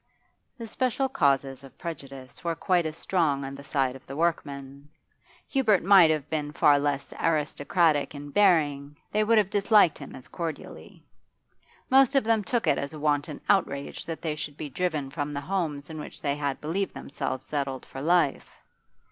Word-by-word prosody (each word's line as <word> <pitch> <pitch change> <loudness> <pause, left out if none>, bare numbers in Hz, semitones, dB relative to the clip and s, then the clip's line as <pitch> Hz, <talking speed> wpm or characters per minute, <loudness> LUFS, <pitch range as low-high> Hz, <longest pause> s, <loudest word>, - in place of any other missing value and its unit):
The 230 - -6
special 255 +4 0
causes 140 - +1
of 135 -1 -14
prejudice 135 -6 -8
were 170 -1 -1
quite 175 0 +1
as 155 +1 -7
strong 155 -7 0
on 135 - -6
the 140 +1 -10
side 135 -2 0
of 135 - -14
the 135 - -7
workmen; 140 -3 -3 0.6
Hubert 225 -8 +2
might 190 -3 +7
have 155 -2 0
been 150 -2 -3
far 145 0 +5
less 140 -1 -2
aristocratic 155 0 +1
in 145 0 -8
bearing, 145 -7 +2
they 215 +1 +2
would 225 +1 +3
have 205 -2 +2
disliked 205 -4 +4
him 140 - -9
as 130 +3 -11
cordially. 165 -4 -7 0.9
Most 270 +1 +5
of 275 - +4
them 220 -1 +2
took 235 +4 -1
it 140 - +2
as 140 +1 -5
a 155 - -8
wanton 145 0 -1
outrage 140 -8 0
that 165 -1 -6
they 155 -2 -1
should 150 -1 -6
be 150 - -5
driven 155 -4 -2
from 145 +1 -3
the 140 - -2
homes 155 -4 -2
in 160 -1 -7
which - - -8
they 140 -2 -1
had 145 -2 -2
believed 185 +6 -2
themselves 135 -2 -4
settled 135 -3 -3
for 135 - -8
life. 170 -2 +2
150 Hz, 180 wpm, -27 LUFS, 140-180 Hz, 0.9 s, might